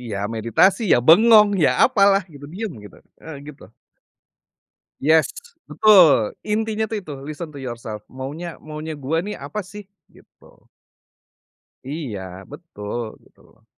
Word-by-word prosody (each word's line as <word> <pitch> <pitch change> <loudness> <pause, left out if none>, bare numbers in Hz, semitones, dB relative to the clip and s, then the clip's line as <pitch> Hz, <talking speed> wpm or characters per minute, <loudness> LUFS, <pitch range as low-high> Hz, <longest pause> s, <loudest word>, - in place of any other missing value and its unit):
Iya 115 -5 -6 0.2
meditasi, 115 - +2
ya - - +5
bengong, 210 +5 +7 0.2
ya - - +4 0.2
apalah 200 -4 +3
gitu, 145 -1 -12
diam 210 +1 -5
gitu, 100 - -14 0.2
heeh 160 -2 -9
gitu. 145 -8 -12 1.4
Yes, 155 +2 +3 0.3
betul, 175 - +4
intinya 220 0 -1
tuh 220 0 -3
itu 155 -7 -9
listen 155 +3 -7
to 140 - -8
yourself, 115 -4 -7
maunya 145 +6 -7
maunya 155 0 -8
gue 145 +4 -2
nih - - -5
apa 210 -1 -6
sih 195 +1 -12 0.2
gitu. - - -23 1.2
Iya, 140 -9 -5 0.3
betul 120 -9 -7 0.2
betul. - - -26
160 Hz, 125 wpm, -21 LUFS, 135-200 Hz, 1.4 s, bengong